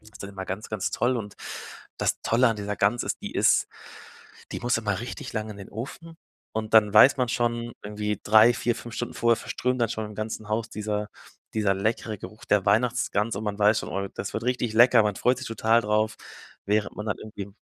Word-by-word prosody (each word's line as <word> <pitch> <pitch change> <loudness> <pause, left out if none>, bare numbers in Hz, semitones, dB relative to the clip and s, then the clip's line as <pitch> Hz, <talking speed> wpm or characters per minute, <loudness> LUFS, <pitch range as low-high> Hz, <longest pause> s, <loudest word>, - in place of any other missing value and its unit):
Das 110 - -17
ist 105 - -11
dann 100 - -7
immer 95 -1 -7
ganz, 95 +4 -5
ganz 105 -3 -2
toll 125 +1 +1
und 105 -3 -6 0.6
das - - 0
Tolle 120 +2 +3
an 115 - -1
dieser 105 0 -4
Gans 105 +5 +2
ist, - - -3
die - - -5
ist - - +3 0.8
die - - -4
muss 120 0 +1
immer 100 -3 -2
richtig 120 - -6
lang 110 0 -3
in 105 - -9
den 100 - -9
Ofen 165 +9 -8 0.4
und 110 0 -4
dann 105 -2 +6
weiß 130 +7 +8
man 125 -2 +1
schon 120 0 -1
irgendwie 105 0 -3
3, 110 +3 +6
4, 120 0 0
5 120 -1 -8
Stunden 120 - -4
vorher 115 -1 +3
verströmt 125 0 -2
dann 115 - +2
schon 110 -2 -3
im 105 - -10
ganzen 110 0 -5
Haus 110 +1 -1
dieser 105 0 -3 0.5
dieser 105 -3 +2
leckere 110 +2 -1
Geruch 105 +4 -10
der 105 -2 +3
Weihnachtsgans 115 0 +1
und 105 - -4
man 105 -1 -3
weiß 105 +1 +4
schon: - - -7
„Oh, 100 +1 -2
das - - -5
wird 110 - -3
richtig 125 -2 0
lecker“, 120 0 +7
man 105 -2 -1
freut 125 0 +2
sich 130 - -6
total 115 +1 +2
drauf, 105 +1 +1 0.5
während 105 +1 0
man 105 - -5
dann 105 - -2
irgendwie 100 -2 -8
110 Hz, 220 wpm, -26 LUFS, 105-120 Hz, 0.8 s, weiß